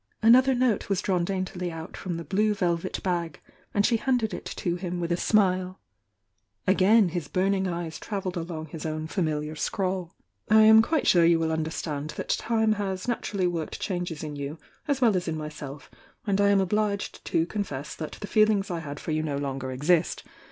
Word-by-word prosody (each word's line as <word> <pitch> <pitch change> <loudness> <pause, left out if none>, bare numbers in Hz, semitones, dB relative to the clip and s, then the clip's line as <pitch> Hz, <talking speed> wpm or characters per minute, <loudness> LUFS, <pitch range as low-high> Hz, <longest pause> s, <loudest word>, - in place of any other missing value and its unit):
Another 255 +4 +6
note 245 -6 +1
was 195 -2 +1
drawn 185 -2 0
daintily 185 -1 -3
out 160 0 -8
from 175 -3 -4
the 170 - -5
blue 210 +4 +1
velvet 175 -1 -1
bag, 170 -4 -2 0.3
and 205 0 +2
she 235 - +3
handed 245 -3 0
it - - -6
to 175 -2 -2
him 180 0 -4
with 170 0 -2
a - - +3
smile. 185 -1 +1 0.9
Again 195 +2 +5
his 170 -3 -4
burning 190 +2 +1
eyes 170 -2 -4
travelled 195 -4 -4
along 165 -2 -4
his 160 0 -8
own 155 0 -3
famihar 155 -3 -2
scrawl: 185 +1 -2 0.3
"I 220 +1 +7
am 220 0 +8
quite 305 +7 0
sure 175 -2 +5
you 165 0 +5
will 160 -1 0
understand 155 -2 -3
that - - -5
time 220 -1 +1
has 195 -2 -2
naturally 205 -5 -1
worked 170 -3 -2
changes 175 -5 -3
in 150 -1 -5
you 140 +2 -5 0.3
as 280 -2 0
well 225 -5 +4
as 180 -1 -1
in 160 -1 -2
myself, 150 -2 -8 0.3
and 200 -1 +1
I 200 - +4
am 200 -1 +4
obliged 205 +1 -1
to 165 - +1
confess 150 -8 -4
that 155 - -6
the - - -7
feelings 210 -1 +2
I 170 - -2
had 145 -2 -7
for 165 - -5
you 155 0 +1
no 150 -3 -2
longer 135 -2 -3
exist. 160 +6 +1
180 Hz, 195 wpm, -27 LUFS, 160-200 Hz, 0.9 s, am